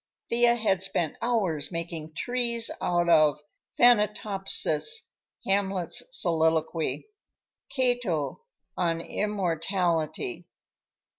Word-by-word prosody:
Thea 240 0 +4
had 210 -6 0
spent 190 -5 -1
hours 190 -12 0
making 165 -2 -5
trees 235 0 0
out 175 -1 +1
of 155 -3 +4 0.4
"Thanatopsis," 210 - +3 0.4
Hamlet's 195 -2 0
soliloquy, 160 - 0 0.6
Cato 245 - -1 0.3
on 165 -2 0
"Immortality." 180 - -2
190 Hz, 75 wpm, -27 LUFS, 165-235 Hz, 0.6 s, Thea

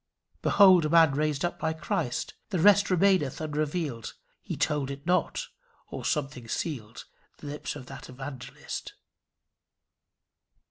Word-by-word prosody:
Behold 185 -4 +6
a - - 0
man 165 -2 +6
raised 150 +2 0
up 175 - -3
by 160 0 0
Christ! 160 -6 -2 0.2
The 195 - -1
rest 205 +3 +5
remaineth 185 -6 +2
unrevealed; 150 -5 -3 0.3
He - - -5
told 150 -3 0
it 140 +1 -7
not; 180 +1 0 0.4
or - - -6
something 135 -5 -2
sealed 115 -4 -4 0.3
The - - -13
lips 145 +1 -5
of 135 -3 -9
that 135 +1 -10
Evangelist. 130 0 -7
150 Hz, 130 wpm, -28 LUFS, 135-170 Hz, 0.4 s, Behold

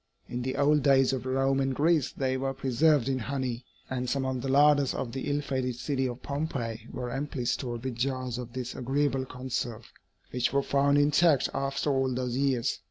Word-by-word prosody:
In 125 - -4
the 130 +1 -2
old 145 +1 +3
days 135 -1 +4
of 130 -1 -3
Rome 135 +1 +1
and 135 -1 0
Greece 155 -1 +2
they 130 -1 -1
were 135 +1 -2
preserved 135 +1 +2
in 135 -1 0
honey, 130 -1 -3 0.2
and 125 -1 -3
some 135 0 0
of 130 -1 -2
the 135 - -4
larders 145 0 +4
of 120 - -3
the 135 +3 -4
ill 145 +1 0
fated 130 -3 -2
city 130 +1 -1
of 120 0 -7
Pompeii 125 -6 -3
were 125 -1 -4
amply 135 -1 -3
stored 120 -1 -2
with 130 -3 -4
jars 130 -1 -2
of 120 -1 -7
this 125 -1 -4
agreeable 135 +1 0
conserve, 120 -3 -5 0.4
which 125 -1 0
were 140 0 +2
found 140 +1 +3
intact 145 0 +4
after 140 +2 -1
all 135 -1 +1
those 125 -1 -2
years. 130 -2 0
130 Hz, 195 wpm, -28 LUFS, 125-140 Hz, 0.4 s, days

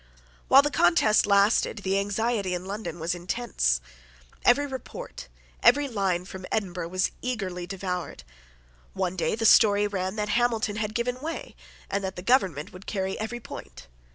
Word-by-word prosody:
While 275 +1 +7
the 295 - 0
contest 205 +4 +4
lasted 200 +1 +3
the 195 +1 +1
anxiety 205 -1 -1
in 180 +1 -6
London 195 -4 -5
was 165 +2 -1
intense. 175 - -1 0.6
Every 265 +4 +4
report, 285 - -8 0.3
every 285 +4 +5
line, 195 -7 -1
from 185 -1 -8
Edinburgh 180 -5 -2
was 185 +2 0
eagerly 190 -8 -3
devoured. 180 - -4 0.7
One 180 - -2
day 185 - 0
the 225 0 -2
story 205 -2 +6
ran 190 -1 -2
that 210 -1 -2
Hamilton 225 -2 +1
had 215 0 -3
given 250 +1 -1
way 330 +11 -5 0.3
and 200 0 -2
that 190 -1 -3
the 180 - -7
government 190 - +1
would 185 +1 -12
carry 190 -2 -2
every 220 +3 -4
point. 225 - -10
200 Hz, 155 wpm, -26 LUFS, 185-235 Hz, 0.7 s, While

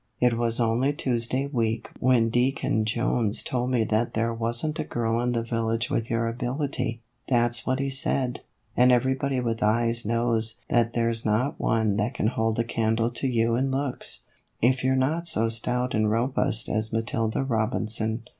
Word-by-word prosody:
It 125 -1 +3
was 115 0 +1
only 120 +5 +2
Tuesday 130 0 -1
week 115 -4 -1
when 120 -3 +3
Deacon 120 -3 +1
Jones 115 -1 0
told 125 0 -2
me 125 -3 +2
that 110 +2 0
there 115 +1 0
was 115 +3 -1
n't 155 0 -3
a - - 0
girl 115 -4 -1
in 125 0 0
the 115 -1 0
village 115 -1 -1
with 115 - -1
your 115 0 0
ability 125 0 -2 0.3
that's 120 -2 +1
what 130 0 +1
he 135 0 -1
said 130 -2 0 0.3
and 125 +1 +5
everybody 130 +2 +1
with 115 -2 -2
eyes 115 +2 +2
knows 115 0 +1
that 115 -1 +2
there's 115 -1 0
not 110 +6 0
one 110 -3 +1
that 110 +3 -1
can 110 - +1
hold 110 -2 -1
a 115 - +2
candle 115 0 0
to 120 +3 -3
you 115 -2 +1
in 135 +3 0
looks, 135 -1 -4 0.4
if 130 +2 +2
you 130 0 +3
're - - +1
not 155 +6 0
so 115 -8 +2
stout 125 +2 -1
and 110 -1 +2
robust 115 0 0
as 110 0 -2
Matilda 115 +1 -1
Robinson. 110 -2 -1
115 Hz, 180 wpm, -26 LUFS, 115-125 Hz, 0.4 s, and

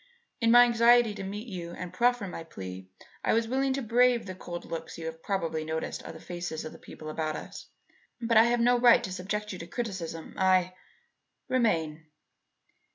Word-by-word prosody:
In 230 -2 +2
my 240 +1 +9
anxiety 235 -1 +5
to 200 -1 -7
meet 205 +5 -6
you 175 -5 -6
and 180 -1 -7
proffer 245 -3 +2
my 165 - -6
plea, 95 - -9 0.3
I - - +2
was 225 0 +2
willing 265 +3 +1
to 270 0 -2
brave 240 0 +3
the 185 - -6
cold 175 -1 -7
looks 165 - -6
you 165 - -7
have 160 0 -6
probably 165 -5 -2
noticed 160 +1 -3
on - - -8
the - - -10
faces 175 -2 -5
of 155 - -6
the - - -13
people 155 - -11
about 155 0 -2
us. - - -8 0.5
But 230 -1 0
I 225 - +8
have 240 0 +2
no 245 +1 +4
right 240 -1 +6
to 185 - -4
subject 210 +3 -3
you 185 - -7
to 170 - -8
criticism. 180 -7 -5
I 185 -1 +3 0.4
" - - -52
"Remain." 160 -11 0
190 Hz, 200 wpm, -29 LUFS, 165-235 Hz, 0.5 s, my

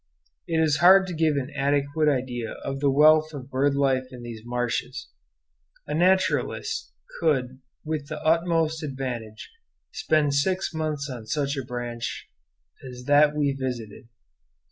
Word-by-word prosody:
It 165 - -1
is 155 -2 +3
hard 190 +3 +7
to 185 - -6
give 160 -2 +1
an 140 0 -3
adequate 145 +2 +1
idea 125 -4 -2
of 135 0 -3
the 140 0 +2
wealth 155 +2 +5
of 135 -1 -9
bird 140 +2 +1
life 135 -2 +1
in 125 -2 -10
these 115 -2 -8
marshes. 120 0 -3 0.8
A 150 - -4
naturalist 185 +4 +1 0.3
could 130 -4 0 0.3
with 155 -2 -3
the 155 +1 -6
utmost 165 -1 +1
advantage 130 - -6 0.4
spend 150 -2 +1
six 180 +6 0
months 155 -3 -2
on 120 -5 -8
such 140 +2 -1
a 135 - -3
branch 120 -1 -5 0.6
as 125 -1 -9
that 145 +2 +4
we 145 -2 +1
visited. 125 -4 -6
140 Hz, 145 wpm, -25 LUFS, 130-155 Hz, 0.8 s, hard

